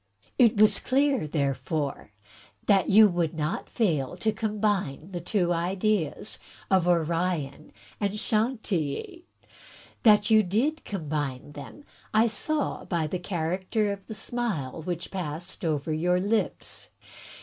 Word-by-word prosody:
It 235 Hz, -4 st, +5 dB
was 215 Hz, +1 st, +6 dB
clear, 270 Hz, -, +1 dB
therefore, 140 Hz, -2 st, -2 dB, 0.5 s
that 195 Hz, -4 st, +3 dB
you 215 Hz, +2 st, +8 dB
would 175 Hz, -3 st, -1 dB
not 155 Hz, 0 st, -2 dB
fail 155 Hz, -, 0 dB
to 220 Hz, -, +1 dB
combine 205 Hz, -7 st, -1 dB
the 175 Hz, -2 st, -4 dB
two 175 Hz, -1 st, +1 dB
ideas 185 Hz, +1 st, -1 dB, 0.3 s
of 185 Hz, -2 st, +4 dB
Orion 165 Hz, -3 st, 0 dB, 0.3 s
and 205 Hz, 0 st, -1 dB
Chantilly. 225 Hz, -, -1 dB, 0.8 s
That 210 Hz, -1 st, +5 dB
you 220 Hz, 0 st, +7 dB
did 235 Hz, -, 0 dB
combine 145 Hz, -7 st, -3 dB
them 145 Hz, -, -10 dB, 0.3 s
I 220 Hz, +1 st, +6 dB
saw 290 Hz, +7 st, -1 dB
by 170 Hz, -3 st, -1 dB
the 165 Hz, +4 st, -3 dB
character 185 Hz, +4 st, -1 dB
of 200 Hz, -1 st, -7 dB
the 220 Hz, -, -6 dB
smile 210 Hz, -, -3 dB
which 175 Hz, +1 st, -4 dB
passed 175 Hz, 0 st, -5 dB
over 155 Hz, -1 st, -1 dB
your 180 Hz, +3 st, +2 dB
lips. 210 Hz, +4 st, -2 dB
185 Hz, 125 wpm, -27 LUFS, 155-215 Hz, 0.8 s, you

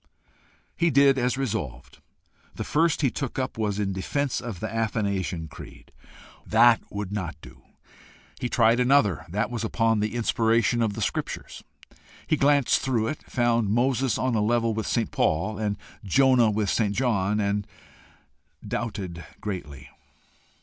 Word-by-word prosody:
He 170 Hz, 0 st, +2 dB
did 140 Hz, -1 st, +4 dB
as 125 Hz, +1 st, 0 dB
resolved. 100 Hz, -, -4 dB, 0.6 s
The -, -, -4 dB
first 160 Hz, 0 st, +1 dB
he 135 Hz, -, +3 dB
took 135 Hz, -4 st, -4 dB
up 130 Hz, -1 st, -2 dB
was 105 Hz, -3 st, -1 dB
in 100 Hz, -2 st, -1 dB
defence 135 Hz, +9 st, -2 dB
of 115 Hz, -8 st, -6 dB
the -, -, -3 dB
Athanasian 100 Hz, -7 st, -1 dB
creed! -, -, -13 dB, 0.5 s
That 120 Hz, -1 st, +5 dB
would 100 Hz, -2 st, -5 dB
not 95 Hz, -6 st, -3 dB
do. -, -, -14 dB, 0.8 s
He 125 Hz, -, -2 dB
tried 115 Hz, 0 st, +3 dB
another. 125 Hz, -, +3 dB
That 105 Hz, +7 st, -1 dB
was 115 Hz, -2 st, -3 dB
upon 115 Hz, 0 st, +1 dB
the 105 Hz, +2 st, -2 dB
Inspiration 115 Hz, 0 st, +2 dB
of 110 Hz, -3 st, +1 dB
the 110 Hz, 0 st, -3 dB
Scriptures. 100 Hz, -, -4 dB, 0.6 s
He 155 Hz, -, +2 dB
glanced 140 Hz, -2 st, +3 dB
through 115 Hz, -4 st, 0 dB
it 155 Hz, -, -5 dB
found 120 Hz, -4 st, +1 dB
Moses 125 Hz, +2 st, +1 dB
on 130 Hz, +2 st, 0 dB
a 110 Hz, -, +1 dB
level 115 Hz, +1 st, +1 dB
with 110 Hz, 0 st, -3 dB
St. 115 Hz, -, 0 dB
Paul, 90 Hz, +7 st, 0 dB
and 105 Hz, -2 st, -1 dB, 0.3 s
Jonah 125 Hz, +3 st, +4 dB
with 105 Hz, -1 st, 0 dB
St. 105 Hz, -3 st, 0 dB
John, 105 Hz, -4 st, +1 dB
and 100 Hz, 0 st, -1 dB, 1.0 s
doubted 95 Hz, -7 st, -4 dB, 0.2 s
greatly. 75 Hz, -9 st, -6 dB
115 Hz, 150 wpm, -25 LUFS, 100-125 Hz, 1.0 s, That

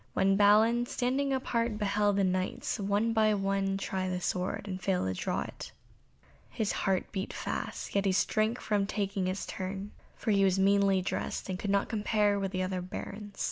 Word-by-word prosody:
When 195 Hz, 0 st, +3 dB
Balin, 220 Hz, +4 st, +5 dB
standing 270 Hz, +2 st, 0 dB
apart 235 Hz, -4 st, 0 dB
beheld 205 Hz, -1 st, +1 dB
the 200 Hz, -, +2 dB
Knights 185 Hz, +4 st, -1 dB
one 205 Hz, +3 st, +1 dB
by 215 Hz, -1 st, +3 dB
one 195 Hz, 0 st, 0 dB
try 190 Hz, -1 st, -2 dB
the 180 Hz, 0 st, -2 dB
sword, 185 Hz, +3 st, -2 dB
and 185 Hz, -1 st, -4 dB
fail 180 Hz, -, 0 dB
to 95 Hz, -, -1 dB
draw 90 Hz, -, -2 dB
it, -, -, -7 dB, 0.8 s
his 215 Hz, -2 st, -1 dB
heart 190 Hz, -1 st, 0 dB
beat 190 Hz, 0 st, -3 dB
fast, -, -, -4 dB
yet 200 Hz, 0 st, +1 dB
he 195 Hz, -, +3 dB
shrank 215 Hz, +5 st, +1 dB
from 205 Hz, -2 st, 0 dB
taking 200 Hz, -2 st, -1 dB
his 185 Hz, +1 st, -2 dB
turn, 195 Hz, +1 st, -5 dB, 0.2 s
for 220 Hz, -, -1 dB
he 200 Hz, -1 st, +4 dB
was 190 Hz, -1 st, +3 dB
meanly 195 Hz, -1 st, +3 dB
dressed, 185 Hz, -, -3 dB
and 185 Hz, -1 st, -3 dB
could 205 Hz, -, -3 dB
not 200 Hz, 0 st, +2 dB
compare 210 Hz, -2 st, +1 dB
with 195 Hz, -1 st, -2 dB
the 185 Hz, -1 st, -1 dB
other 185 Hz, 0 st, -2 dB
Barons. 200 Hz, +3 st, -7 dB
200 Hz, 185 wpm, -30 LUFS, 190-210 Hz, 0.8 s, Balin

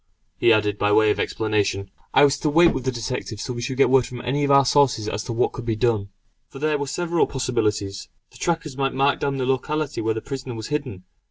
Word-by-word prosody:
he 115 Hz, -, +4 dB
added 105 Hz, -2 st, +2 dB
by 105 Hz, -, +2 dB
way 110 Hz, 0 st, +4 dB
of -, -, -2 dB
explanation. 105 Hz, -3 st, -1 dB, 0.2 s
I -, -, +5 dB
was 140 Hz, 0 st, +3 dB
to 155 Hz, -, 0 dB
wait 170 Hz, +3 st, +5 dB
with 130 Hz, -1 st, -4 dB
the 130 Hz, -, +1 dB
detectives 120 Hz, -3 st, -5 dB
till 125 Hz, -, -4 dB
we 120 Hz, -, -5 dB
should 130 Hz, +2 st, -4 dB
get 140 Hz, -, +5 dB
word 130 Hz, -2 st, +4 dB
from 125 Hz, -, -8 dB
any 145 Hz, +4 st, -1 dB
of 140 Hz, -, +1 dB
our 140 Hz, -1 st, +6 dB
sources 125 Hz, -5 st, +2 dB
as 105 Hz, 0 st, -3 dB
to -, -, -5 dB
what 115 Hz, +2 st, +1 dB
could 125 Hz, -, -7 dB
be 115 Hz, -1 st, -1 dB
done. 110 Hz, -3 st, 0 dB, 0.4 s
For -, -, -11 dB
there 150 Hz, +1 st, 0 dB
were 145 Hz, -, -3 dB
several 170 Hz, +4 st, 0 dB
possibilities. 105 Hz, -7 st, -2 dB, 0.2 s
The -, -, -16 dB
trackers 165 Hz, -5 st, -2 dB
might 135 Hz, -1 st, -1 dB
mark 135 Hz, +1 st, +2 dB
down 140 Hz, -1 st, -1 dB
the 130 Hz, -, -1 dB
locality 145 Hz, +3 st, -1 dB
where 110 Hz, 0 st, 0 dB
the -, -, -2 dB
prisoner 130 Hz, 0 st, -6 dB
was 110 Hz, -1 st, -6 dB
hidden. 135 Hz, -11 st, -4 dB
130 Hz, 245 wpm, -23 LUFS, 110-140 Hz, 0.4 s, our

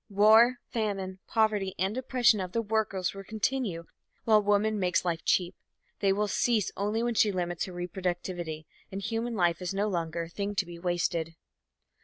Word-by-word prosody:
War, 220 Hz, +5 st, +6 dB, 0.2 s
famine, 195 Hz, -4 st, -2 dB
poverty 210 Hz, -4 st, +1 dB
and 190 Hz, +4 st, 0 dB
oppression 250 Hz, -4 st, +3 dB
of 185 Hz, -1 st, -4 dB
the 230 Hz, -, +1 dB
workers 205 Hz, -4 st, -1 dB
will 195 Hz, 0 st, -8 dB
continue 215 Hz, -4 st, -2 dB, 0.4 s
while 215 Hz, -2 st, +5 dB
woman 205 Hz, +1 st, +2 dB
makes 180 Hz, -1 st, +1 dB
life 165 Hz, -2 st, -1 dB
cheap. 180 Hz, -1 st, +1 dB, 0.5 s
They 195 Hz, -1 st, +3 dB
will 210 Hz, +2 st, +1 dB
cease 220 Hz, 0 st, +1 dB
only 210 Hz, +3 st, -1 dB
when 240 Hz, 0 st, 0 dB
she 215 Hz, -1 st, +3 dB
limits 175 Hz, -2 st, -2 dB
her 185 Hz, -, -9 dB
reproductivity 175 Hz, -2 st, -4 dB, 0.3 s
and 195 Hz, -, -4 dB
human 225 Hz, +3 st, -2 dB
life 175 Hz, -3 st, +1 dB
is 180 Hz, +2 st, -3 dB
no 205 Hz, +2 st, +1 dB
longer 170 Hz, -3 st, -2 dB
a -, -, -7 dB
thing 200 Hz, +3 st, -4 dB
to 195 Hz, -, +1 dB
be 170 Hz, -1 st, -10 dB
wasted. 170 Hz, -2 st, -1 dB
195 Hz, 175 wpm, -29 LUFS, 175-215 Hz, 0.5 s, War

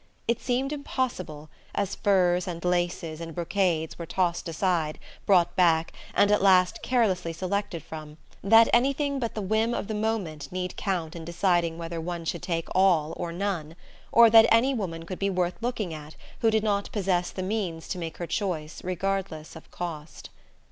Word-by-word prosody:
It 235 Hz, 0 st, 0 dB
seemed 265 Hz, +3 st, -1 dB
impossible, 185 Hz, -, -4 dB, 0.2 s
as 200 Hz, -1 st, -1 dB
furs 180 Hz, -3 st, +2 dB
and 170 Hz, -1 st, -5 dB
laces 175 Hz, -2 st, -1 dB
and 165 Hz, -2 st, -7 dB
brocades 170 Hz, -3 st, 0 dB
were 170 Hz, -, -5 dB
tossed 175 Hz, -2 st, -1 dB
aside, 165 Hz, -2 st, 0 dB, 0.3 s
brought 180 Hz, -4 st, +4 dB
back, 165 Hz, -3 st, +3 dB, 0.2 s
and 205 Hz, 0 st, +4 dB
at 210 Hz, -, +3 dB
last 185 Hz, -2 st, +4 dB
carelessly 195 Hz, -9 st, +1 dB
selected 185 Hz, 0 st, -3 dB
from, 155 Hz, -1 st, -9 dB, 0.3 s
that 225 Hz, +3 st, +7 dB
anything 275 Hz, +3 st, +2 dB
but 235 Hz, -3 st, -3 dB
the 215 Hz, -, -3 dB
whim 220 Hz, +4 st, +1 dB
of -, -, -3 dB
the 220 Hz, -, -3 dB
moment 200 Hz, -10 st, -2 dB
need 180 Hz, 0 st, -3 dB
count 175 Hz, -5 st, -2 dB
in 165 Hz, -, -7 dB
deciding 170 Hz, -1 st, +1 dB
whether 165 Hz, 0 st, -5 dB
one 170 Hz, 0 st, -5 dB
should 170 Hz, +1 st, -2 dB
take 165 Hz, -3 st, -2 dB
all 175 Hz, -5 st, +3 dB
or 170 Hz, -, -4 dB
none, 170 Hz, -4 st, -3 dB, 0.4 s
or 230 Hz, -1 st, +7 dB
that 225 Hz, 0 st, +8 dB
any 240 Hz, +5 st, +4 dB
woman 165 Hz, -8 st, -4 dB
could 185 Hz, +1 st, -6 dB
be 200 Hz, -, +1 dB
worth 180 Hz, +1 st, -1 dB
looking 225 Hz, -7 st, -2 dB
at 155 Hz, 0 st, -9 dB, 0.2 s
who 225 Hz, -, +3 dB
did 220 Hz, -1 st, +2 dB
not 205 Hz, -2 st, 0 dB
possess 185 Hz, -4 st, 0 dB
the 185 Hz, -, -5 dB
means 185 Hz, -5 st, -3 dB
to 180 Hz, -, -3 dB
make 165 Hz, -2 st, -5 dB
her 175 Hz, -, -4 dB
choice 170 Hz, -5 st, -3 dB
regardless 185 Hz, -3 st, -3 dB
of 160 Hz, -, -12 dB
cost. 160 Hz, -3 st, -7 dB
180 Hz, 175 wpm, -27 LUFS, 165-205 Hz, 0.4 s, that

